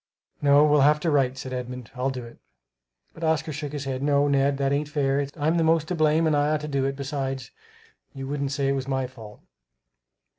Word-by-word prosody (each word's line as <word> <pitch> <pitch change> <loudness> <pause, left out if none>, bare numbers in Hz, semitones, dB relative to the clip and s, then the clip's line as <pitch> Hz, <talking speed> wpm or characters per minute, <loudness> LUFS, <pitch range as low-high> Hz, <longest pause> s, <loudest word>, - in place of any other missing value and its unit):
"No, 145 +1 +6
we'll 150 -1 +4
have 150 +2 +5
to 165 - +1
write," 135 -3 +2
said 130 -1 -6
Edmund; 125 -1 -6
"I'll 125 +2 -1
do 125 -2 -5
it." 115 - -14 0.7
But 165 - -10
Oscar 160 -1 0
shook 145 0 -5
his 145 -2 -5
head. 130 -1 -3
"No, 145 0 +2
Ned, 140 0 +2
that 135 0 0
ain't 145 +1 -1
fair. 140 -1 0
I'm 160 +3 +1
the 165 - +2
most 160 -1 +2
to - - 0
blame 155 0 +3
and 155 -2 +2
I 145 0 +2
ought 155 -1 0
to 150 - -5
do 140 -2 0
it. 135 0 -1
Besides 135 -2 -4 0.6
you 135 0 -6
wouldn't 140 -1 -2
say 140 -1 0
it - - +3
was 135 -1 -2
my 130 -1 0
fault." 115 -5 -12
140 Hz, 225 wpm, -25 LUFS, 135-150 Hz, 0.7 s, No